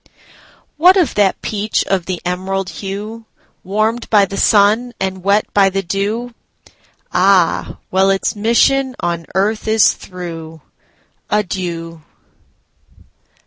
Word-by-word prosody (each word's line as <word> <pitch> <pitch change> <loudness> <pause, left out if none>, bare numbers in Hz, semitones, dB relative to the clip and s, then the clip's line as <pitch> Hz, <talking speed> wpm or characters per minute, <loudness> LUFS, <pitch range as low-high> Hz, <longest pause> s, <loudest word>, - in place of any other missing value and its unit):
What 360 +5 +6
of 350 -7 +2
that 200 -2 +1
peach 215 0 -1
of 185 -3 -1
the 185 -2 -3
emerald 190 +1 -2
hue, 210 +3 -7 0.4
Warmed 215 +5 -1
by 205 -2 +5
the 195 - -7
sun, 215 +5 +3
and 190 -1 -3
wet 200 +2 +2
by 195 -1 +4
the 195 +1 -2
dew? 210 +6 -3 0.8
Ah, 185 -2 +2
well, 190 +1 +3
its 195 +2 0
mission 255 +5 +2
on 170 -1 -3
earth 210 +3 0
is 220 -1 +4
through. 165 -3 -9 0.7
Adieu! 175 -5 -3
195 Hz, 115 wpm, -17 LUFS, 185-220 Hz, 0.8 s, What